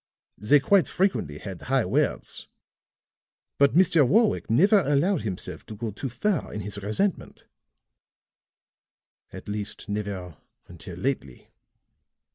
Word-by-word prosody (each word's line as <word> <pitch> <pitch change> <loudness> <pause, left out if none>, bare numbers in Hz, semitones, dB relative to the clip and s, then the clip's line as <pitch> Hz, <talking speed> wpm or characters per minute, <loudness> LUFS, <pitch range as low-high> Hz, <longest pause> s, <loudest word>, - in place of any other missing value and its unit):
They 115 +9 +4
quite 180 0 +3
frequently 180 - -1
had 95 0 -8
high - - +1
words; - - -1 1.1
but 140 +1 +4
Mr. 175 -2 +5
Warwick 210 - +2
never 195 - +5
allowed 160 +3 +1
himself 95 -5 -6
to 110 - -8
go 110 +1 -4
too 130 +7 -5
far 160 - -1
in 105 - -5
his 100 +1 -6
resentment 165 - -2 1.9
at - - -10
least 105 +2 -5
never 100 -6 -4 0.3
until 85 0 -10
lately. 90 - -4
115 Hz, 115 wpm, -26 LUFS, -, 1.9 s, Mr